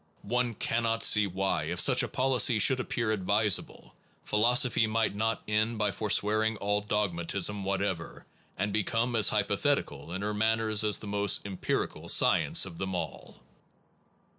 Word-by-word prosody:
One 125 Hz, -2 st, -2 dB
cannot 115 Hz, +1 st, -1 dB
see 105 Hz, -1 st, +5 dB
why, 95 Hz, -4 st, -2 dB
if 85 Hz, +3 st, -4 dB
such 130 Hz, +3 st, +4 dB
a 120 Hz, -, -2 dB
policy 125 Hz, 0 st, +2 dB
should 130 Hz, +4 st, +3 dB
appear 115 Hz, -3 st, -2 dB
advisable, 105 Hz, 0 st, -1 dB, 0.3 s
philosophy 120 Hz, +2 st, +2 dB
might 110 Hz, -1 st, -1 dB
not 110 Hz, +2 st, -2 dB
end 110 Hz, +2 st, -1 dB
by 105 Hz, -1 st, 0 dB
forswearing 110 Hz, +1 st, 0 dB
all 105 Hz, +1 st, -1 dB
dogmatism 100 Hz, -1 st, -1 dB
what 100 Hz, 0 st, -2 dB
ever, 90 Hz, -5 st, -5 dB, 0.3 s
and 100 Hz, +2 st, -2 dB
become 115 Hz, +3 st, -1 dB
as 110 Hz, -4 st, +4 dB
hypothetical 70 Hz, +3 st, -2 dB
in 95 Hz, +3 st, -5 dB
her 105 Hz, +1 st, -2 dB
man 110 Hz, +2 st, +1 dB
ners 110 Hz, -1 st, 0 dB
as 105 Hz, -1 st, +2 dB
the -, -, -9 dB
most 100 Hz, -1 st, +1 dB
empirical 95 Hz, -2 st, -4 dB
science -, -, +4 dB
of 85 Hz, -3 st, -10 dB
them 95 Hz, -1 st, -4 dB
all. 80 Hz, -6 st, -7 dB
105 Hz, 155 wpm, -28 LUFS, 95-115 Hz, 0.3 s, see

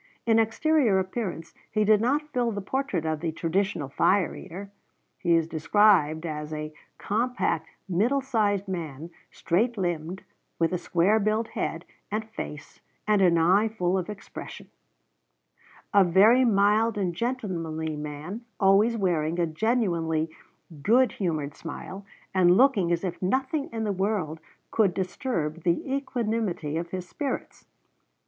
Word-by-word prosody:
In 225 Hz, -1 st, +4 dB
exterior 225 Hz, 0 st, +2 dB
appearance 190 Hz, -3 st, -3 dB, 0.2 s
he 215 Hz, 0 st, +1 dB
did 210 Hz, 0 st, +4 dB
not 285 Hz, +6 st, +1 dB
fill 240 Hz, -2 st, +1 dB
the 205 Hz, -, -3 dB
portrait 200 Hz, -, -2 dB
of 155 Hz, -1 st, -1 dB
the 165 Hz, 0 st, -2 dB
traditional 170 Hz, -1 st, -1 dB
fire 180 Hz, +7 st, +2 dB
eater. 190 Hz, +3 st, -9 dB, 0.5 s
He 170 Hz, -3 st, +3 dB
is 165 Hz, -1 st, +2 dB
described 165 Hz, -1 st, +3 dB
as 150 Hz, -1 st, -5 dB
"a 155 Hz, 0 st, -5 dB, 0.2 s
compact 215 Hz, -7 st, -1 dB, 0.2 s
middle 215 Hz, +10 st, +2 dB
sized 210 Hz, -7 st, 0 dB
man, 165 Hz, -3 st, -5 dB, 0.2 s
straight 215 Hz, +8 st, 0 dB
limbed, 175 Hz, 0 st, -3 dB, 0.3 s
with 165 Hz, +1 st, +1 dB
a 180 Hz, -, 0 dB
square 180 Hz, +5 st, +2 dB
built 215 Hz, +2 st, 0 dB
head 165 Hz, +2 st, -3 dB, 0.2 s
and 215 Hz, +1 st, -3 dB
face, 150 Hz, -9 st, -8 dB, 0.3 s
and 210 Hz, -2 st, +3 dB
an 175 Hz, -3 st, +5 dB
eye 185 Hz, +7 st, +4 dB
full 185 Hz, -5 st, -1 dB
of 185 Hz, +1 st, -2 dB
expression"; 205 Hz, -1 st, -9 dB, 1.2 s
"a 200 Hz, -1 st, +7 dB
very 205 Hz, +8 st, +5 dB
mild 210 Hz, +1 st, +3 dB
and 185 Hz, -4 st, -1 dB
gentlemanly 170 Hz, -9 st, -3 dB
man, 150 Hz, +8 st, -6 dB, 0.2 s
always 205 Hz, +4 st, +4 dB
wearing 170 Hz, -5 st, 0 dB
a 175 Hz, -, +3 dB
genuinely 165 Hz, -4 st, 0 dB, 0.5 s
good 240 Hz, -, +4 dB
humored 155 Hz, -6 st, -2 dB
smile, 185 Hz, +5 st, -8 dB, 0.3 s
and 180 Hz, -1 st, +5 dB
looking 220 Hz, -9 st, +4 dB
as 170 Hz, +1 st, 0 dB
if 180 Hz, -2 st, -4 dB
nothing 265 Hz, +9 st, 0 dB
in 225 Hz, -1 st, -3 dB
the 210 Hz, -, 0 dB
world 190 Hz, -5 st, -1 dB, 0.3 s
could 205 Hz, -6 st, +2 dB
disturb 180 Hz, -, -2 dB
the 175 Hz, -, 0 dB
equanimity 225 Hz, -, -2 dB
of 170 Hz, +1 st, -3 dB
his 180 Hz, 0 st, -5 dB
spirits." 280 Hz, +2 st, -5 dB
190 Hz, 140 wpm, -26 LUFS, 165-220 Hz, 1.2 s, a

